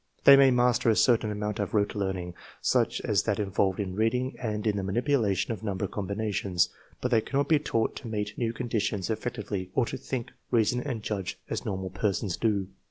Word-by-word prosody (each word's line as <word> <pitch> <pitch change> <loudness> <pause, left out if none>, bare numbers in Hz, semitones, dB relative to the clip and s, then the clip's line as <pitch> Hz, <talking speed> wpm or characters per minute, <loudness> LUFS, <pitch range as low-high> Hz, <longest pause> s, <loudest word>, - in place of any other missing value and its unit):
They 140 - +10
may 135 -1 +7
master 125 -1 +3
a 110 - +4
certain 115 -3 +3
amount 105 +1 -3
of 100 +1 -2
rote 100 -1 +2
learning, 95 -3 -3 0.3
such - - +1
us - - +3
that - - -1
involved 95 -1 0
in 95 -3 -2
reading 125 +5 0
and 105 -3 -2
in 105 -2 +2
the 100 - -1
manipulation 110 0 +1
of 110 - -8
number 100 -2 -2
com 100 0 -4
binations, 100 -4 0 0.3
but 125 - -1
they 115 -2 +4
cannot 140 +4 -1
be 155 -1 +4
taught 115 -6 0
to 125 - -8
meet 105 -1 -3
new 115 -2 -1
condi 115 -2 -2
tions 105 0 -1
effectively 105 -4 -3
or 130 - +3
to - - -5
think, 130 -2 -4 0.2
reason, 120 0 +2
and 125 -6 -4
judge 100 -4 -3
as - - -3
normal 95 -1 -3
persons 95 0 -1
do. 100 -4 0
105 Hz, 205 wpm, -28 LUFS, 100-120 Hz, 0.3 s, They